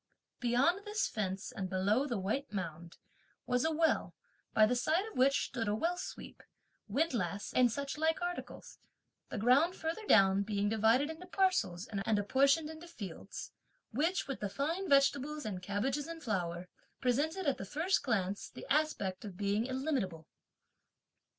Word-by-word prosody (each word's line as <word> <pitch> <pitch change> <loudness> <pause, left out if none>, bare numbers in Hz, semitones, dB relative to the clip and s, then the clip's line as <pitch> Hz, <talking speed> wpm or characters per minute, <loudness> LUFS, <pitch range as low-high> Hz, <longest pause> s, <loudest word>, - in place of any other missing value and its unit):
Beyond 270 +11 +2
this 420 0 0
fence 195 -3 -3
and 190 -1 -4
below 200 +9 +2
the 240 -5 -1
white 215 +9 -2
mound, 170 -4 -5 0.5
was 250 0 +1
a 320 - +2
well, 320 +1 +1 0.4
by 215 - +6
the 245 - +1
side 315 - +1
of 440 - -10
which 270 +2 +4
stood 230 -5 -3
a 205 - +1
well 335 +10 0
sweep, 360 - -8 0.5
windlass 210 - -1
and 250 -2 +4
such 280 +4 -4
like 320 0 +2
articles; 350 0 -6 0.5
the - - -4
ground 265 - +4
further 325 +7 -3
down 195 -1 +6
being 205 0 0
divided 225 +7 +3
into 335 +3 -10
parcels, 365 - +1
and 210 +1 0
apportioned 275 +9 +3
into 320 +2 -9
fields, 205 - -8 0.4
which, 325 - 0
with 275 - -4
the 205 - -2
fine 330 - -2
vegetables 280 +2 +3
and 190 -4 -4
cabbages 240 - -1
in 335 0 -6
flower, 180 - -2 0.3
presented, 300 +9 0
at 280 -3 +1
the - - -4
first 320 - 0
glance, 200 -5 -1
the - - -10
aspect 275 -11 0
of 200 -4 -8
being 205 +3 0
illimitable. 260 - -2
250 Hz, 155 wpm, -33 LUFS, 200-315 Hz, 0.5 s, by